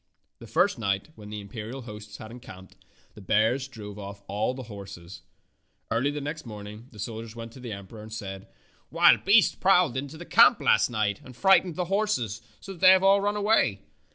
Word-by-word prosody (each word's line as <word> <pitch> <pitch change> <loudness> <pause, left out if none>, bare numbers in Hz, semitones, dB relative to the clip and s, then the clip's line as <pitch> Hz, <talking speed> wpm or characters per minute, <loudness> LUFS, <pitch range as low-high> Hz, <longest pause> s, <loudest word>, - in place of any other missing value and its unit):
The 115 - -11
first 180 - +1
night, 100 +2 -1
when 105 -5 -12
the 105 0 -6
imperial 115 +5 -7
host 105 -2 -10
had 110 - -10
encamped, 95 -6 -12 0.4
the 105 - -13
bears 110 +7 +1
drove 105 -5 -10
off 100 0 -9
all 105 +6 -1
the 130 - -7
horses. 95 -6 -10 0.7
Early 120 +5 +1
the 145 +1 -4
next 150 +2 -5
morning 105 0 -9
the 110 - -16
sol 110 +2 -5
diers 115 0 -10
went 115 -1 -8
to 130 - -13
the 125 -2 -7
emperor 100 +2 -9
and 110 +1 -11
said, 100 -3 -7 0.4
"Wild - - +5
beasts 205 +2 +5
prowled 180 -8 +3
into 140 +4 -5
the 175 - -9
camp 235 +4 +6
last - - +3
night 110 -4 -1
and 125 - -13
frightened 190 0 +4
the 180 - -2
horses 170 - -1 0.2
so 195 - -9
that 175 - -15
they 185 - +8
have 190 0 +3
all 195 +1 +5
run 205 +1 0
away." 200 - +2
115 Hz, 205 wpm, -26 LUFS, 105-155 Hz, 0.7 s, they